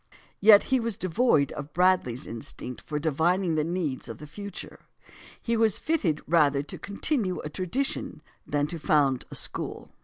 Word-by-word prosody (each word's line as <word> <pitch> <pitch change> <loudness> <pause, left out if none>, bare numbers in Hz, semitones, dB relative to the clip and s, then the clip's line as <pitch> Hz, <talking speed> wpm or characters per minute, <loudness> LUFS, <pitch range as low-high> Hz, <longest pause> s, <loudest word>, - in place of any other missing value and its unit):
Yet 205 0 +8
he 260 - +5
was 230 -3 -1
devoid 185 - +2
of 145 0 -7
Bradley's 180 -9 +2
instinct 115 +2 -6
for 150 - -4
divining 165 +4 +1
the 155 -1 +1
needs 165 -5 -3
of - - -6
the 150 - -10
future. 200 +5 -9 0.6
He 235 - -1
was 220 -2 +3
fitted 200 - 0
rather 145 -4 +3
to 150 - -8
continue 200 - -1
a 150 - -6
tradition 195 - -3 0.2
than 145 0 +1
to 165 +2 -5
found 140 -4 +2
a - - -7
school. - - -2
170 Hz, 160 wpm, -27 LUFS, 150-200 Hz, 0.6 s, Yet